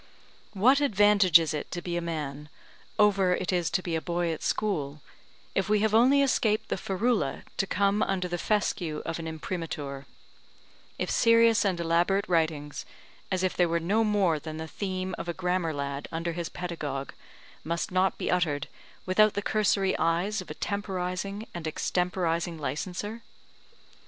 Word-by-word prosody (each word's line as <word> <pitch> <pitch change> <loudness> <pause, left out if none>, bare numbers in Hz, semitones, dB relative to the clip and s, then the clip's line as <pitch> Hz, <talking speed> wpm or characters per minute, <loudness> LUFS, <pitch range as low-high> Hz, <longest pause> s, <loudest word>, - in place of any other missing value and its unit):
What 255 +8 +4
advantage 205 - +6
is 160 -1 -1
it 150 - -4
to 175 - -4
be 175 0 -4
a 175 - 0
man, 150 -3 -5 0.5
over 195 -3 +4
it 185 +1 -2
is 175 -2 +1
to 185 - -1
be 170 -2 -2
a 160 - -1
boy 175 0 -1
at 160 - -5
school, 150 -9 -2 0.5
if 195 +1 0
we 210 -1 +3
have 215 0 +1
only 260 +5 +5
escaped 220 -5 +1
the - - 0
ferula 195 - -1
to 195 - 0
come 200 +2 +1
under 185 -2 0
the 175 0 -3
fescue 175 -7 -1
of 165 0 -3
an 165 - -5
Imprimatur; 155 -4 -5 0.9
if - - -2
serious 230 -1 +5
and 190 -4 0
elaborate 175 +4 +1
writings, 160 -4 0 0.5
as 185 -1 0
if 185 - 0
they 175 - +3
were 170 0 +1
no 200 +7 +1
more 200 -7 +2
than 155 0 -7
the 160 0 -5
theme 185 +1 -4
of 175 - -5
a 170 - -2
grammar 180 -2 0
lad 140 -1 -4
under 165 +1 -2
his 170 0 -4
pedagogue, 150 -6 -4 0.5
must 170 +2 -2
not 185 +1 +2
be - - -2
uttered 165 -5 0 0.4
without 215 +3 +4
the 205 - -1
cursory 205 -3 +2
eyes 180 +5 +1
of 185 - -12
a - - -6
temporizing 195 0 -3
and 170 -2 -6
extemporizing 170 0 -1
licenser? 180 - -4
180 Hz, 165 wpm, -28 LUFS, 165-200 Hz, 0.9 s, advantage